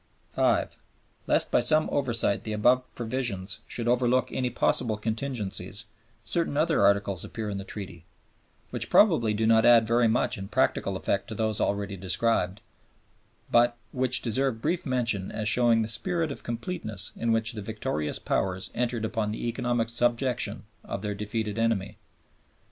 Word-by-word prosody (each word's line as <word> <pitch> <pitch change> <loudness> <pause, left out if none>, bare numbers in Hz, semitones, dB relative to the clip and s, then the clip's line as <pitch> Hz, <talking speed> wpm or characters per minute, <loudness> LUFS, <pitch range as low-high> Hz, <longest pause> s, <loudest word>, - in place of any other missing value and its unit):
(5) - - +1 0.5
Lest - - +2
by - - +4
some 155 +6 +2
oversight 120 -7 +1
the 110 - -4
above 125 +4 +3
provisions 110 -5 -2
should 120 -1 -4
overlook 125 +1 +2
any 125 -1 -1
possible 110 -2 0
contingencies, 110 -3 -4 0.4
certain 165 -1 -1
other 155 +2 +2
Articles 100 -3 +2
appear 110 -2 -5
in 100 - -4
the - - -6
Treaty, 95 -4 -7 0.7
which - - -3
probably 160 - +4
do 110 +1 0
not 110 0 +5
add 115 -1 +6
very 115 +1 +3
much 110 -1 +1
in 95 - -6
practical 105 -4 0
effect 100 +1 -1
to 110 - -6
those 110 -1 0
already 100 -1 -1
described, 95 +1 0 0.9
but 120 0 +4
which 130 -1 +2
deserve 130 0 0
brief 170 +6 -1
mention 115 -7 +1
as 105 - -3
showing 115 -1 +4
the - - -3
spirit 155 +9 0
of - - -6
completeness 115 - -3
in 115 0 -1
which 115 0 +4
the 110 -3 -6
victorious 100 -8 -3
Powers 95 0 -2
entered 120 -2 -1
upon 110 -1 -2
the 110 +2 -4
economic 120 -1 -1
subjection 120 -2 0 0.2
of 100 - -6
their 105 -1 -2
defeated 105 +1 -3
enemy. 105 -2 -1
115 Hz, 155 wpm, -27 LUFS, 105-120 Hz, 0.9 s, add